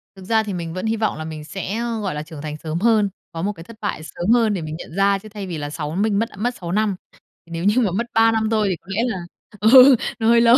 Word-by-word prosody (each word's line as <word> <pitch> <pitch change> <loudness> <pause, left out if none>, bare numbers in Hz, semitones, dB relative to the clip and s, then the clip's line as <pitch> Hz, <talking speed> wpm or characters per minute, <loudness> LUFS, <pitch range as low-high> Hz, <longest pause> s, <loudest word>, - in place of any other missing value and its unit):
Thực 190 - -12
ra 220 +2 +2
thì 205 -2 -4
mình 170 -2 -4
vẫn 185 +3 -4
hy 220 0 +1
vọng 220 -7 0
là 155 - -5
mình 155 -1 -7
sẽ, 195 +5 -4
ơ, 235 -1 -2
gọi 195 -7 -2
là, 150 - -3
trưởng 155 -2 -10
thành 150 0 -5
sớm 155 +1 -4
hơn, 215 -1 +3 0.2
có 165 - -5
một 200 +4 0
cái 165 - -11
thất 230 +6 -13
bại 205 - -2
sớm 175 +4 -4
hơn 225 -3 +3
để 180 - -2
mình 155 0 -5
nhận 165 - -10
ra, 195 0 +3
chứ 215 - -12
thay 205 -2 -7
vì 170 -3 -4
là 145 -1 -4
6 150 0 -4
minh 200 +1 +1
mất, 230 +1 0
a, - - -15
mất 240 +4 -1
6 170 -1 -6
năm. 210 0 +1 0.6
Nếu 165 0 -4
như 210 +6 +3
mà 205 - +1
mất 215 +7 -1
3 225 0 +5
năm 220 -1 +1
thôi 215 -2 +2
thì 185 - 0
có 175 - -31
lẽ 200 +4 0
là 220 -6 -2 0.4
ừ, 255 +5 +8 0.2
nó 225 - +1
hơi 235 0 +6
lâu. 235 +1 +7
200 Hz, 305 wpm, -21 LUFS, 170-225 Hz, 0.6 s, ừ